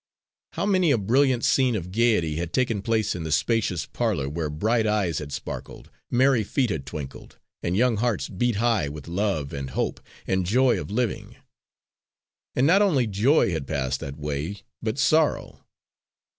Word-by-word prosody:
How - - -2
many 185 -4 +3
a 140 - +4
brilliant 125 +4 +2
scene 130 -3 +3
of 90 -3 -4
gaiety 105 -8 +2
had 85 0 -4
taken 120 -6 +1
place 110 0 0
in 90 - -5
the 80 -1 -4
spacious 90 - +1
parlour 65 - -1
where 75 +2 -3
bright 110 +9 +1
eyes 100 -7 0
had 75 -2 -7
sparkled, - - -7 0.2
merry 130 -2 +3
feet 120 +3 0
had 70 -6 -4
twinkled, 70 -1 -8 0.2
and 90 +2 -1
young 120 -1 +3
hearts 120 0 0
beat 115 +4 -1
high 110 -8 +1
with 75 0 -9
love 85 -5 -1
and 70 -1 -4
hope - - -2 0.3
and 95 0 0
joy 125 +4 +3
of - - -8
living! 115 +2 -2 1.2
And 130 - +3
not 185 +6 +5
only 155 -12 +3
joy 110 +4 +3
had 80 -5 -3
passed 65 -3 -1
that 70 +1 -7
way, 75 +6 -4 0.2
but 110 +2 -2
sorrow. 155 +2 +1
105 Hz, 170 wpm, -25 LUFS, 80-120 Hz, 1.2 s, not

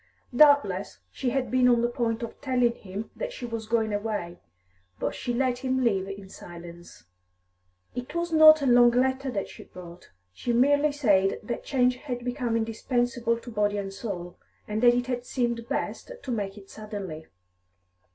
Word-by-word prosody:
Doubtless 245 - +4
she 255 - -2
had 265 0 -1
been 255 0 +4
on 240 -1 +3
the - - +3
point 235 -1 -2
of 230 - -8
telling 250 -3 +2
him 200 0 -8
that - - -4
she 255 - -7
was 230 -2 -5
going 220 -2 +1
away; 205 -5 -3 0.6
but - - -2
she 245 - -4
let 250 0 0
him 260 0 0
leave 195 -5 +1
in 195 0 -8
silence. 175 - -12 0.9
It 250 +6 -6
was 340 0 -1
not 310 -1 +8
a - - +1
long 245 -1 +6
letter 260 +2 +1
that 200 -6 -3
she - - -13
wrote; 175 -1 -11 0.2
she 240 - -2
merely 285 +4 +4
said 200 -9 +2
that 235 +3 -4
change 250 -2 +2
had 245 -3 -6
become 245 -2 -1
indispensable 235 +1 -1
to 235 +1 -10
body 205 -1 0
and 195 -1 -4
soul, 180 -5 -6 0.3
and 215 +1 -2
that 240 0 +6
it 245 0 0
had 245 -1 -3
seemed 235 -2 -2
best - - -3
to 260 - -4
make 205 -3 -3
it 195 -1 -13
suddenly. 200 -7 -7
235 Hz, 175 wpm, -27 LUFS, 205-255 Hz, 0.9 s, not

